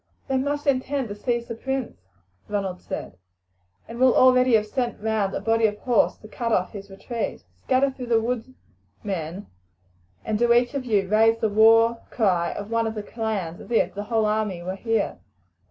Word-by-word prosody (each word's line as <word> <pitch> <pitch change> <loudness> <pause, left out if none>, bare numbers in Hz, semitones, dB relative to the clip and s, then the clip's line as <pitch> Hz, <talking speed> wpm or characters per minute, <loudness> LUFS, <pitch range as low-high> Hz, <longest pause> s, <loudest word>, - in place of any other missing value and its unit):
"They 265 -1 +1
must 285 +2 -2
intend 270 -2 0
to 205 - -5
seize 235 +2 -2
the 230 - -4
prince," 265 +1 -3 0.5
Ronald 195 -3 -3
said, 90 - -6 0.7
"and 230 +1 -8
will 255 -1 +5
already 255 -1 +5
have 215 -1 +2
sent 245 +2 -3
round 215 -2 -1
a - - -1
body 225 0 +2
of 210 0 -4
horse 240 0 +2
to 215 - -13
cut 230 +1 -3
off 180 -4 +1
his 200 -1 -9
retreat. 225 +4 -5 0.2
Scatter 265 +1 +2
through 255 -2 -8
the 230 -1 +3
wood, 245 +2 -3 0.5
men, 185 -1 -4 0.8
and 215 -1 -1
do 240 0 +3
each 245 +3 +2
of 275 -2 -3
you 205 -5 +1
raise 225 +3 +4
the 220 -1 0
war 225 +2 +5
cry 180 -7 +1
of 205 +2 -7
one 230 0 +1
of 220 - -4
the 210 - -4
clans 205 -8 -4
as - - -12
if 235 - +1
the 205 +1 -5
whole 220 0 +1
army 210 -4 -1
were 185 +2 -4
here. 225 +3 -1
225 Hz, 190 wpm, -24 LUFS, 205-245 Hz, 0.8 s, will